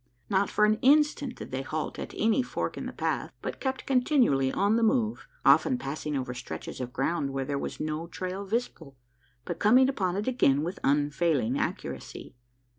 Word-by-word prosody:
Not 195 0 +2
for 210 - +3
an 215 +1 +2
instant 290 -1 +3
did - - -9
they 130 +1 -2
halt 155 +3 -4
at - - -6
any 225 +4 +3
fork 250 - -3
in - - -5
the - - -5
path, - - -2
but - - -4
kept 265 -1 -3
continually 250 - +3
on 205 +2 +2
the 230 - +2
move, 225 -1 +1 0.2
often 260 - +5
passing 150 - -4
over 125 -1 -3
stretches 125 - -7
of 125 -1 -4
ground 140 +2 -1
where 135 -1 -2
there 140 0 -2
was - - -5
no 155 +2 -3
trail 185 +3 -5
visible, 190 - -4 0.5
but - - -4
coming 250 +5 +6
upon 185 -9 -1
it 205 +4 -2
again 145 - +3
with 175 +4 -4
unfailing 145 -3 +1
accuracy. - - -5
185 Hz, 185 wpm, -28 LUFS, -, 0.5 s, coming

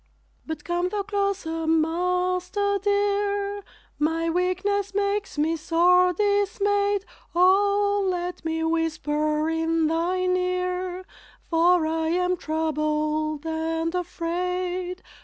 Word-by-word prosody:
But 315 -2 -5
come 350 +1 -1
thou 410 +1 -2
closer, 390 -5 -2
Master 360 +5 +1
dear, 405 0 0 0.4
My 325 +2 +1
weakness 380 +3 0
makes 405 -3 -1
me 315 +2 +1
sore 350 +3 +4
dismayed, 405 +1 +1 0.3
O, 400 +2 +3
let 355 -1 -3
me 320 0 -1
whisper 310 -2 0
in 325 0 +1
thine 365 +3 +1
ear, 365 0 -2 0.5
For 340 0 +4
I 320 0 -1
am 360 +2 +1
troubled 310 -1 -1
and 325 +1 -2
afraid. 360 +1 -3
360 Hz, 100 wpm, -25 LUFS, 325-395 Hz, 0.5 s, sore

